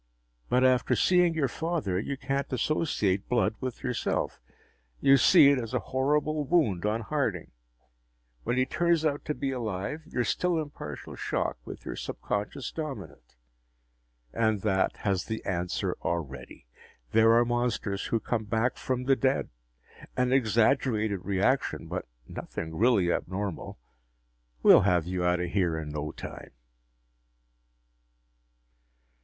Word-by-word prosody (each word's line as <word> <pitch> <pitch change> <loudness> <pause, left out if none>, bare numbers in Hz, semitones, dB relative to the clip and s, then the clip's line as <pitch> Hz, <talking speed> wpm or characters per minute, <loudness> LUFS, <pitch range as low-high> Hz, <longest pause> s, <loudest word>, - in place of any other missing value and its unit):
"But 125 +1 +3
after 130 -1 +3
seeing 180 -2 +3
your 150 -4 +1
father, 150 - -2
you 135 +7 -3
can't 135 0 -2
associate 120 - 0
blood 115 -3 +2
with 130 -2 -5
yourself 125 - -2 0.6
you 135 - +6
see 140 +1 +7
it 140 - +2
as 115 -3 -4
a - - +2
horrible 150 +3 +1
wound 130 - +1
on 110 +2 0
Harding. 115 - -2 0.9
When 120 - -1
he 130 - +3
turns 170 +1 +1
out 145 -2 0
to 150 - -2
be 135 -1 -2
alive, 115 +3 -3
you're 125 - -1
still 175 +7 0
in 150 -2 -4
partial 75 - -8
shock, - - -2
with - - -9
your - - -4
subconscious 105 +6 -4
dominant. 130 - -7 1.0
And 110 -3 +1
that 95 -2 +1
has 95 -3 +1
the 110 0 -5
answer 90 -1 -2
already. 75 -8 -5 0.5
There 115 0 +5
are 120 +1 +5
monsters 120 -4 -1
who 115 - 0
come 110 -1 -2
back 110 +3 0
from 125 -1 -2
the 135 +1 +3
dead! 130 +1 0 0.7
An 125 0 +2
exaggerated 110 -4 +2
reaction, 100 +8 0
but - - -5 0.2
nothing 80 0 -6
really 105 -4 +3
abnormal. 95 0 -3 0.9
We'll - - +8
have 90 -4 +2
you 90 0 -2
out 90 0 +2
of 90 -1 -3
here 90 -5 +1
in 80 -1 -5
no 75 0 -4
time." - - -9
115 Hz, 140 wpm, -28 LUFS, 95-135 Hz, 1.0 s, We'll